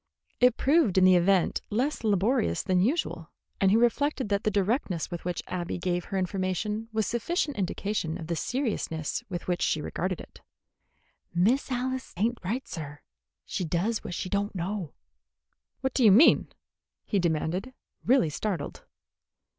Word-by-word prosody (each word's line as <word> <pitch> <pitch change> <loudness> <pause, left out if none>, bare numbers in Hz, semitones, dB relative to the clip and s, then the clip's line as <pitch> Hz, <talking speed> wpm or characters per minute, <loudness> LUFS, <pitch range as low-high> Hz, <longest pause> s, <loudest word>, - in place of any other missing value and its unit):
It 250 -1 +5
proved 275 - +3
in 185 - +6
the 185 0 +7
event 180 0 +3
less 250 +6 -1
laborious 215 +3 +1
than 185 -2 +2
usual, 200 - -1 0.3
and 195 - +4
he 210 - +5
reflected 255 +1 +1
that 200 0 0
the - - +2
directness 200 - 0
with 175 - -5
which 180 -1 -2
Abby 180 -1 -3
gave 175 -1 -1
her 195 - -3
information 195 +4 -2
was 220 -1 0
sufficient 290 - -1
indication 195 -3 -2
of 165 - -7
the 170 +1 -2
seriousness 200 - -2
with 175 -3 -5
which 180 -1 0
she 155 - +1
regarded 180 +4 -3
it. - - -13 0.9
"Miss 235 +11 +2
Alice 260 +1 -3
ain't 230 +5 0
right, 230 +9 -3
sir. 145 -3 -7 0.4
She 185 - -3
does 180 +7 -1
what 175 - -5
she - - -3
don't 200 +2 -1
know." 185 -2 -4 0.9
"What 265 -1 -1
do 260 - +2
you 215 - +8
mean?" 240 +12 +6 0.6
he 205 - +1
demanded, 170 +6 -1 0.3
really 240 - +3
startled. 175 -3 -4
200 Hz, 155 wpm, -28 LUFS, 175-235 Hz, 0.9 s, you